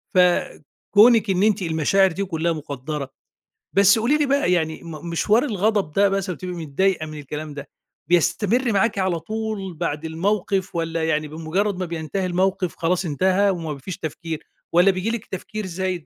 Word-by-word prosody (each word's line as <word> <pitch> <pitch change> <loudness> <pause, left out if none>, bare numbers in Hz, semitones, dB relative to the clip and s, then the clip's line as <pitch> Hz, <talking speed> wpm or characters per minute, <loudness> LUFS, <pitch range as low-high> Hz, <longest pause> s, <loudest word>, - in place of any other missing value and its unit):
فكونِك 200 - +3
إن 190 +1 +2
أنتِ 210 -2 +2
المشاعر 175 +3 +2
دي 200 +4 -2
كُلها 170 -2 -1
مُقدّرة. 145 -2 -5 0.6
بس 200 +2 +5
قولي 270 +7 +2
لي 300 - +2
بقى 280 -6 +2
يعني 160 -3 0
م 165 0 -8
مشوار 210 - +2
الغضب 205 - 0
ده 200 +4 +3
مثلًا 195 -2 -2
بتبقى 180 -1 -6
متضايقة 165 +2 0
من 155 -1 -8
الكلام 150 +1 -6
ده، 145 - -8 0.4
بيستمر 210 - +2
معاكِ 215 +2 +1
على 185 -3 0
طول 215 0 -4
بعد 160 -1 -3
الموقف، 190 +3 -1
والّا 165 -1 -1
يعني 155 -1 0
بمجرد 165 +6 -2
ما 185 - -1
بينتهي 170 +3 -3
الموقف 185 0 0
خلاص 175 +2 0
انتهى 190 +6 +2
وما 165 -5 -3
فيش 165 +6 -7
تفكير، 160 0 -5 0.3
والّا 180 +3 +6
بييجي 185 +4 -2
لِك 230 -1 -3
تفكير 210 +3 -6
زايد 185 -2 -3
180 Hz, 165 wpm, -22 LUFS, 160-200 Hz, 0.6 s, والّا